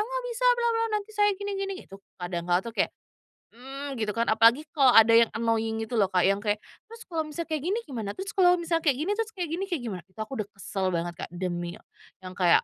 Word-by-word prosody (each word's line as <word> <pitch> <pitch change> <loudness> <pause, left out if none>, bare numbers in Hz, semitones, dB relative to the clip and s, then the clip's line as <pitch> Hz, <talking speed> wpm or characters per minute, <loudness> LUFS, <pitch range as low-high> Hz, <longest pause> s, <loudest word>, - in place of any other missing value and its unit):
aku 425 - -1
nggak - - -3
bisa, - - -3
bla 475 0 +1
bla 455 0 +1
nanti 420 +1 -6
saya 415 0 +3
gini 405 +1 -4
gini." 390 0 -2
Gitu 195 - -12 0.2
kadang 175 -1 -4
kala 175 +2 +2
tuh 230 - -6
kayak, - - +1 0.6
mmm, 270 +2 -7
gitu 210 -2 -2
kan, 230 - +2
apalagi 230 +6 +5
kalau 270 -5 +4
ada 225 0 +8
yang 235 - +5
annoying 225 -1 0
gitu 225 +1 -2
loh 200 - +4
Kak, 185 -1 +2
yang 195 +2 +3
kayak, 210 0 -1 0.2
"Terus 460 +1 -12
kalau 320 -2 -1
misal 305 +3 -4
kayak 315 -2 -3
gini 370 +10 -1
gimana? 225 -8 -5
Terus 390 +2 -5
kalau 365 -4 +5
misal 335 -1 0
kayak 305 -5 +2
gini, 380 - -1
terus 445 -1 -1
kayak 355 -4 -3
gini, 350 +4 -2
kayak 345 -8 -2
gimana?" 190 -7 -5
Itu 190 +3 -21
aku 215 - -16
udah 210 - -2
kesel 195 0 -3
banget 170 +1 -2
Kak, - - -40
demi, 175 -1 -3 0.5
yang 185 - -7
kayak, 175 -2 +4
240 Hz, 245 wpm, -27 LUFS, -, 0.6 s, ada